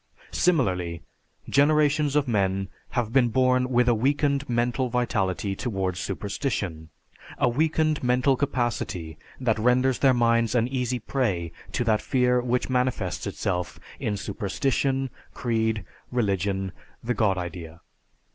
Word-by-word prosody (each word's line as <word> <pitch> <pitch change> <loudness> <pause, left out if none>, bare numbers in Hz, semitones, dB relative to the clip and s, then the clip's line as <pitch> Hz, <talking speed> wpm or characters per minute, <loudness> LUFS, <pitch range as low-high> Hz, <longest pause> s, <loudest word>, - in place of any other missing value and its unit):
Similarly, 90 - +1 0.4
generations 150 0 +3
of 145 -2 +2
men 95 -4 0 0.3
have 115 -2 0
been 130 -3 +5
born 130 +1 +2
with 125 -1 +3
a 120 - +5
weakened 140 +3 +1
mental 120 +2 0
vitality 100 -5 0
towards 95 -6 -2
superstition; 100 - -3 0.5
a - - +3
weakened 155 +4 +1
mental 125 +2 +3
capacity 120 - -2 0.2
that 115 -4 +1
renders 125 +3 +3
their 135 -2 +4
minds 115 0 +2
an 120 -1 +3
easy 125 -1 -1
prey 105 -9 -1 0.2
to 120 - 0
that 110 -2 +2
fear 125 -1 +2
which 125 0 0
manifests 125 -8 -1
itself 90 -2 -3 0.2
in 105 - -1
superstition, 130 +7 -1 0.2
creed, 110 -4 0 0.3
religion 100 -4 0 0.3
the 120 +2 0
God 105 -5 +2
idea. 85 -2 -6
120 Hz, 125 wpm, -26 LUFS, 95-130 Hz, 0.5 s, been